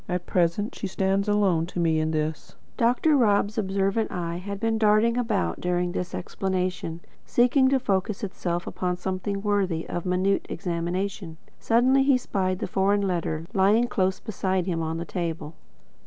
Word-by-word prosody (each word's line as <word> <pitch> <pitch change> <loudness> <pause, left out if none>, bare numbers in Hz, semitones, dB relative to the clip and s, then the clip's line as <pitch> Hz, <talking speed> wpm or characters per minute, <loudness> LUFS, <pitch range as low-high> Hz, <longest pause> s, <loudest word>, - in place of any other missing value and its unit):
At 180 -1 -2
present 180 +4 0
she 200 - -4
stands 195 +2 0
alone 190 -6 +2
to 180 - -5
me 165 -2 +2
in 155 0 0
this." 155 -1 -3 0.2
Dr. 250 +6 +3
Rob's 210 -3 +2
observant 195 +2 0
eye 170 -1 -3
had 200 +2 -6
been 225 0 0
darting 215 +2 +4
about 225 -5 -1
during 180 0 0
this 180 -1 -4
explanation, 185 -3 -3 0.2
seeking 255 +2 +3
to 270 - +3
focus 195 -3 -1
itself 175 -3 -3
upon 180 -1 -2
something 190 +2 -3
worthy 195 -6 0
of 175 +1 -4
minute 185 +2 +1
examination. 175 0 -3 0.2
Suddenly 255 +4 +3
he 270 -1 +4
spied 185 -6 -1
the - - -3
foreign 195 +2 +2
letter 165 -3 -2
lying 205 +4 +4
close 190 -4 0
beside 190 -4 -1
him 170 -3 -1
on 160 0 -2
the 170 - -4
table. 165 -4 -4
190 Hz, 160 wpm, -25 LUFS, 175-210 Hz, 0.2 s, darting